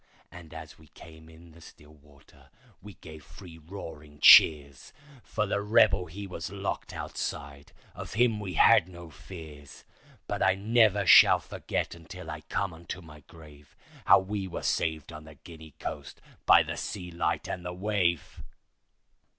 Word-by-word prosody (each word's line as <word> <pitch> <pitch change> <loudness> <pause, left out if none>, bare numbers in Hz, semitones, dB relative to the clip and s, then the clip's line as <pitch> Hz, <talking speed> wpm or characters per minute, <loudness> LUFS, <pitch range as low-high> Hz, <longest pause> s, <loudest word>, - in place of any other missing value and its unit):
And 85 -2 -13
as 80 -1 -11
we 80 - -19
came 80 +1 -16
in 80 +1 -17
the 85 +1 -18
still 75 -1 -17
water 75 -1 -22 0.3
we 105 -1 -13
gave 80 -2 -13
three 80 0 -14
roaring 75 -4 -11
cheers, 70 -3 +6 0.3
For 105 - -3
the 100 0 -2
rebel 100 -3 +3
he 100 +5 -8
was 90 -2 -7
locked 100 0 -5
outside—of 70 0 -8
him 115 -1 +1
we 95 -4 -6
had 85 - +5
no 85 -2 -12
fears; 75 -3 -12 0.4
But - - -5
I 95 +1 +3
never 105 -1 +2
shall - - +7
forget - - -5
until 80 -1 -10
I - - -8
come 95 -3 -3
unto 85 +2 -9
my 75 -4 -14
grave, 75 -3 -17 0.3
How - - +7
we 95 0 -4
were 90 - -7
saved 80 0 -2
on 75 -1 -11
the 80 -1 -14
Guinea 80 0 -14
coast 70 -3 -8 0.3
by - - +7
the - - -6
sea 90 -3 -6
light 85 - -2
and 90 - -6
the 90 - -5
wave. 90 -4 -2
85 Hz, 160 wpm, -28 LUFS, 75-95 Hz, 0.4 s, shall